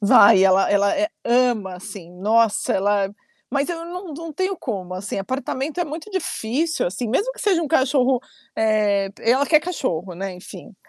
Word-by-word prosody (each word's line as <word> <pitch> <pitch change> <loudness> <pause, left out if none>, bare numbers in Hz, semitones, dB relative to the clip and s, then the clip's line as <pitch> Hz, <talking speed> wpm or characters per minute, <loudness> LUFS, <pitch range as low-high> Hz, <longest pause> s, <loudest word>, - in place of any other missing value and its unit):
Vai, 200 -2 +7
ela 190 0 +4
ela 200 0 +3 0.3
ama, 235 -6 +2
assim. 185 -2 -10
Nossa, 220 +1 +2
ela 200 0 +1 0.4
mas 280 +4 0
eu 335 -1 -4
não 355 -1 -7
não 325 +1 -7
tenho 375 +4 -1
como, 185 -6 -5
assim, 190 +2 -5
apartamento 265 - -3
é 350 - +1
muito 315 +7 -7
difícil, 320 - -1
assim, 200 +7 -3
mesmo 410 - 0
que - - -12
seja 380 -7 +2
um 300 - -3
cachorro, 260 -2 +2 0.4
eh, 210 -3 +2
ela 260 +5 +2
quer 305 -2 +5
cachorro, 195 - -3
né, 190 +2 -5
enfim. 185 +3 -12
240 Hz, 165 wpm, -22 LUFS, 200-315 Hz, 0.4 s, Vai